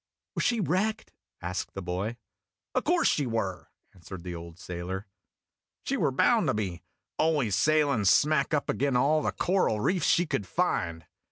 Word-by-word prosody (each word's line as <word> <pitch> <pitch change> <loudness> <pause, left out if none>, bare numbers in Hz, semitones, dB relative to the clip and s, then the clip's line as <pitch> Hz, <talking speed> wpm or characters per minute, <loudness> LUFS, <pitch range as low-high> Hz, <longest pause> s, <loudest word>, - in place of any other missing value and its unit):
"Was - - -1
she 235 -2 +2
wrecked?" 210 +4 -1 0.3
asked 90 +2 -4
the 95 - -4
boy. 95 +6 -3 0.3
" - - -63
O' - - +2
course 350 0 +2
she 145 -4 +1
were," 100 -6 -3 0.2
answered 90 -1 -10
the 90 -1 -5
old 85 -1 -9
sailor. 90 +3 -5 0.8
"She - - -1
were - - +2
bound - - +3
to - - +1
be 95 -5 -3 0.4
always 145 -10 +2
sailing 145 -5 +2
smack 140 +7 +4
up 150 -2 0
ag'in' 140 -2 0
all 150 +5 +3
the - - 0
coral 180 - +1
reefs 175 - +1
she 175 - +4
could 105 - -2
find. 85 -2 -1
110 Hz, 170 wpm, -28 LUFS, -, 0.8 s, smack